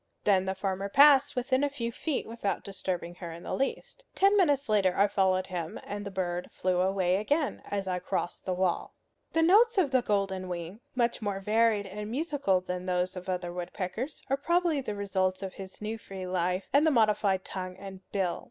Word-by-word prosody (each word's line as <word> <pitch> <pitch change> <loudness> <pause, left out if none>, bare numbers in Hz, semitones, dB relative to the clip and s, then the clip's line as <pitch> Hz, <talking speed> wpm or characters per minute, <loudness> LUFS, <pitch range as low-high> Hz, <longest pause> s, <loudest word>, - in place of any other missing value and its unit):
Then 190 -2 +3
the 190 0 -1
farmer 195 +1 -2
passed 285 +3 +6
within 260 +2 +1
a 290 - +2
few 235 -4 -4
feet 290 +4 -2
without 225 -3 -3
disturbing 185 -3 -4
her 170 - -5
in 165 +1 -9
the - - -4
least. 275 - -3
Ten 395 +2 +4
minutes 290 -8 +3
later 200 -4 +3
I 200 - +6
followed 190 -2 +2
him, 175 -4 -5
and 205 0 -5
the 200 - -5
bird 180 -2 -3
flew 180 -1 0
away 185 -1 +2
again 285 +8 0
as 200 -1 -2
I 180 -1 -1
crossed 175 0 -3
the 185 - 0
wall. 180 -1 -1 0.4
The 325 - +3
notes 430 +7 +5
of 325 -8 +3
the 260 -2 +4
golden 195 -4 -1
wing 175 +3 -5 0.2
much 235 -1 +1
more 200 -2 -2
varied 215 +1 +2
and 210 +2 -6
musical 275 - 0
than 180 0 -4
those 180 +1 0
of 185 +1 -7
other 180 -1 -2
woodpeckers 185 - -5
are 270 +1 +1
probably 340 0 +1
the 210 -5 -4
results 190 -1 -1
of 190 - -5
his 190 +1 -10
new 220 +1 -3
free 190 -3 -7
life, 180 +1 -1
and 290 +3 +5
the - - +6
modified 210 -6 +2
tongue 185 -1 -6
and 195 -1 -9
bill. 190 -3 0
195 Hz, 200 wpm, -29 LUFS, 185-255 Hz, 0.4 s, passed